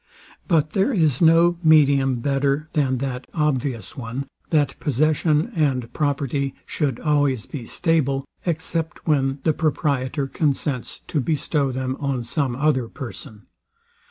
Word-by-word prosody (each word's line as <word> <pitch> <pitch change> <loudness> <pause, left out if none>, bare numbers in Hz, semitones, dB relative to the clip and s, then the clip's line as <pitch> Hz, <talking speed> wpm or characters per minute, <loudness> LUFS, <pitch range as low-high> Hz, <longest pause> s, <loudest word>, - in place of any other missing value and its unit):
But 155 -4 +2
there 195 - +2
is 160 - +2
no 170 +1 +5
medium 140 -5 +4
better 140 +3 0
than 135 -4 +1
that 130 -1 -4
obvious 135 - -1
one, 125 +2 -5 0.2
that 150 -3 +1
possession 150 +2 +1
and 130 -7 0
property 140 -2 -1
should 140 -6 -2
always 145 -6 +1
be 125 -5 -7
stable, 140 -5 0 0.2
except 165 0 -3
when 135 -3 +2
the 160 - +3
proprietor 145 -3 0
consents 140 -2 -2
to 150 - -1
bestow 145 0 0
them 130 +1 -3
on 135 -4 -1
some 130 +1 -1
other 135 -3 +1
person. 120 -3 -9
140 Hz, 130 wpm, -22 LUFS, 130-155 Hz, 0.2 s, no